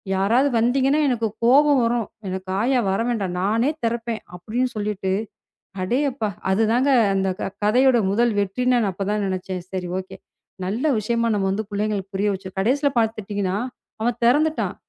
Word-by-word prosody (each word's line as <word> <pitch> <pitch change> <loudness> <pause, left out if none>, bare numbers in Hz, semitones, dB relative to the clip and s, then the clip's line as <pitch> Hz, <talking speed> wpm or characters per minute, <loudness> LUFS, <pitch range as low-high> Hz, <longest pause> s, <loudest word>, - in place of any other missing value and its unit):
யாராவது 230 +9 +3
வந்தீங்கன்னா, 265 +5 +2
எனக்குக் 225 -4 -1
கோவம் 285 +3 +5
வரும். 230 -1 0 0.2
எனக்கு 185 0 -5
ஆயா 255 +2 +2
வர 195 - 0
வேண்டாம். 205 -6 -1
நானே 225 +7 +2
திறப்பேன் 230 -1 -2 0.2
அப்டின்னு 230 +8 -2
சொல்லிட்டு. 205 -2 -2 0.7
அடேயப்பா! 250 +2 0 0.2
அதுதாங்க 225 +7 +2 0.2
அந்தக் 190 -1 -1 0.2
கதையோட 250 +4 +4
முதல் 235 +3 +2
வெற்றி. 200 +5 -1
நான் 235 -4 +2
அப்பத் 195 +2 -4
தான் 210 0 0
நெனைச்சேன். 185 -1 -3
சரி 185 -2 -4
ஓகே. 190 - -9 0.5
நல்ல 215 +9 -2
விஷயமா 230 +2 0
நம்ம 195 +2 -1
புள்ளைகளுக்கு 205 -1 -2
புரிய 205 +2 +1
வச்சு 190 0 -6
கடைசியில 275 +8 +2
பாத்தீங்கன்னா 205 -4 -1 0.5
அவன் 235 +1 0
தெறந்துட்டான். 305 +6 +2
220 Hz, 140 wpm, -22 LUFS, 195-245 Hz, 0.7 s, கோவம்